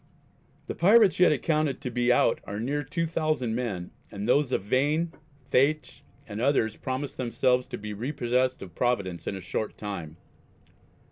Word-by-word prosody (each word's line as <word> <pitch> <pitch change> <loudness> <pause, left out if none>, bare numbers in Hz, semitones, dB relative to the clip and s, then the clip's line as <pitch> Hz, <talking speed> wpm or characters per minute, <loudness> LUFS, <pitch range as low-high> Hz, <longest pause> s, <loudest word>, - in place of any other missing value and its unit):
The - - -4
Pirates 205 +1 +5
yet 180 - +6
accounted 150 -1 0
to 125 - -4
be 120 +1 +2
out 120 - +3
are 100 +1 -5
near 140 +6 -1
2,000 155 -4 -1
men 105 -8 -3 0.2
and 100 +2 -5
of 140 +2 +3
those - - -13
Vain, 145 - 0 0.3
Thaitch, 140 0 +1 0.3
and 105 0 -5
others 120 -5 +2
promise 130 +2 -4
themselves 125 0 +1
to - - -6
be 105 0 -6
repossessed 125 +1 -1
of 90 -3 -11
Providence 95 -8 -1
in - - -2
a 95 - -6
short 105 +4 -4
time. 85 -7 -6
125 Hz, 155 wpm, -27 LUFS, 105-145 Hz, 0.3 s, yet